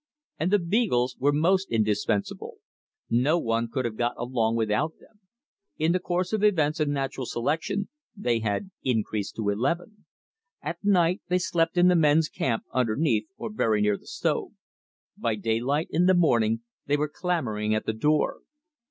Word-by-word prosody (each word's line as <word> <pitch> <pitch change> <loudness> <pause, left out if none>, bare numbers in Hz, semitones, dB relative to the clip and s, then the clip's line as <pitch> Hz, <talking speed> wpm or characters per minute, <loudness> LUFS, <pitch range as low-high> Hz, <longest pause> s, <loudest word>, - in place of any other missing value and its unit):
And 165 - +1
the 205 - +5
beagles 170 - +1
were 145 +2 +3
most 185 +6 +2
indispensable. 105 -2 -1 0.5
No 125 +8 +2
one 115 -5 0
could 130 0 -2
have 110 -2 -3
got 120 0 0
along 115 -2 0
without 115 +8 0
them. 215 - -23 0.6
In 160 +2 +2
the 185 - +2
course 180 +2 -2
of 215 -1 0
events 160 -7 +2
and 150 -2 +1
natural 135 -2 -3
selection 165 - -1 0.3
they 120 - 0
had 110 - -2
increased 110 -4 -1
to 105 -2 -1
eleven. 170 - -2 0.6
At - - -5
night 180 -2 +3
they 180 - +3
slept 170 -1 0
in 175 +1 +6
the 180 - +5
men's 155 -1 +4
camp 115 -4 -1
underneath 125 0 +1
or 215 - -6
very 110 - +1
near 105 0 +2
the - - -22
stove. - - -2 0.6
By 115 -2 -1
daylight 120 +8 -1
in 175 +3 +3
the 185 - +5
morning 115 -9 +2 0.3
they 145 +1 +2
were 150 +1 0
clamoring 125 - -1
at 110 - -2
the 110 - -1
door. 150 +7 +1
145 Hz, 165 wpm, -26 LUFS, 115-175 Hz, 0.6 s, in